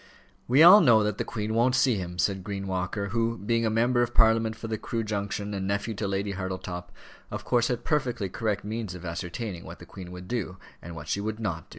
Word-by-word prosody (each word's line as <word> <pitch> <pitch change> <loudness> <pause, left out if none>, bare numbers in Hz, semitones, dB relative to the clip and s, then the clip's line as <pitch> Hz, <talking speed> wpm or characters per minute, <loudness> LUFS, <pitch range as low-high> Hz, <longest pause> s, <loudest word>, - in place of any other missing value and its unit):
"We 135 +6 +6
all 185 +5 +10
know 115 -8 +6
that 105 0 -2
the - - +1
Queen 105 0 -3
won't 120 +3 +3
see 130 -1 +4
him," 90 -4 -4
said 95 +1 0
Green 100 0 -4
Walker, 95 +2 -2
who, 115 +2 0
being 115 +2 0
a - - +2
member 120 +3 +2
of 120 0 -1
Parliament 110 0 +4
for 115 0 -7
the 110 -1 -3
Crewe 115 -1 -3
Junction, 100 -1 -3
and 95 -1 -3
nephew 100 +3 -1
to 100 0 -3
Lady 100 +1 -1
Hartletop, 95 -2 -5 0.4
of - - -6
course 120 -1 +2
had 120 -1 -3
perfectly 125 -9 0
correct 105 +1 -2
means 105 -3 -4
of 90 0 -9
ascertaining 90 +3 -5
what - - -9
the - - -12
Queen 90 -2 -10
would 90 0 -9
do, 100 -6 -3 0.2
and 85 0 -9
what 75 -1 -8
she 100 - -1
would 110 +1 -3
not. 85 -8 -3
105 Hz, 230 wpm, -27 LUFS, 95-115 Hz, 0.4 s, all